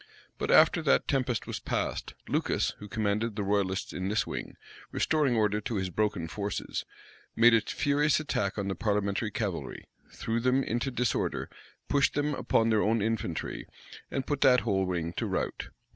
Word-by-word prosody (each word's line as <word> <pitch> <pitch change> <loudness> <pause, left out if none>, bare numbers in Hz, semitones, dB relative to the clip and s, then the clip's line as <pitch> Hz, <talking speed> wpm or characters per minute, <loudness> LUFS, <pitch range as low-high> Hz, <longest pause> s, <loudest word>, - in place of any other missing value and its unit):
But - - -2
after - - +6
that 65 - +2
tempest 130 -4 0
was - - -4
past, - - -3
Lucas, - - 0
who 105 - -8
commanded 110 0 -1
the 105 - -2
royalists 100 -1 0
in 95 +1 -2
this 110 +1 +1
wing, - - -6 0.4
restoring 150 -6 +2
order 105 -1 +2
to 115 - -3
his 95 -2 -2
broken 100 -3 0
forces, 100 +3 -4 0.5
made 115 +1 +6
a 115 - +5
furious 145 0 +1
attack 125 -11 -1
on 100 -1 -2
the 95 - -1
parliamentary 105 +1 0
cavalry, 100 -5 -4 0.3
threw 115 +1 -2
them 130 +3 +2
into 120 +3 -1
disorder, 125 -2 -1 0.4
pushed 140 -1 +2
them 145 0 +1
upon 115 -4 +2
their 110 -1 +3
own 110 +2 +2
infantry, 105 -6 -2 0.4
and 135 - -2
put 145 -1 -2
that 125 -1 +6
whole 95 -4 +1
wing 85 -2 -2
to - - -1
rout. - - -3
110 Hz, 170 wpm, -29 LUFS, 100-125 Hz, 0.5 s, after